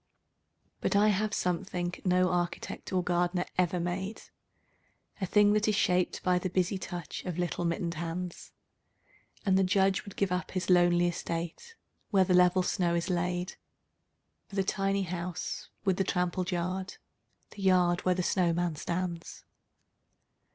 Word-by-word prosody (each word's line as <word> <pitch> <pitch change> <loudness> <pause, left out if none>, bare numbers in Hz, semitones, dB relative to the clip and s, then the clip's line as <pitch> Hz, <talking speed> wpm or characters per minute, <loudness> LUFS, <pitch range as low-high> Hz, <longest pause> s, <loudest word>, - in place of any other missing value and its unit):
But - - 0
I 210 +1 +5
have 210 +1 +1
something 180 -1 -1
no 180 0 +3
architect 175 -1 -3
or 185 -1 +1
gardener 175 +1 +1
ever 180 -1 +1
made, 185 +5 -3 1.0
A 190 - 0
thing 205 +2 +5
that 215 +1 +2
is 215 - +2
shaped 180 -2 +1
by 180 -1 +3
the 185 - -2
busy 185 +2 0
touch 175 -2 -6
of 180 -3 -4
little 175 0 -1
mittened 170 0 -1
hands: 170 +2 -5 0.9
And 190 -1 +4
the - - +4
Judge 190 +1 +2
would 200 - -11
give 195 -2 0
up 180 0 -1
his 185 -1 -1
lonely 175 -1 +5
estate, 175 - -4 0.3
where 195 -4 +4
the 180 - +2
level 180 +1 +5
snow 175 -1 +1
is 170 +2 -1
laid 180 +1 -1 0.9
For 195 - -11
the 195 - +2
tiny 195 +1 0
house 175 -1 -4 0.2
with 190 -2 +2
the 195 - +2
trampled 180 0 -1
yard, 185 +1 -3 0.5
the 205 - -10
yard 180 -2 +3
where 185 0 +2
the 180 - -1
snowman 175 -3 +1
stands. 170 0 -4
180 Hz, 150 wpm, -30 LUFS, 175-190 Hz, 1.0 s, I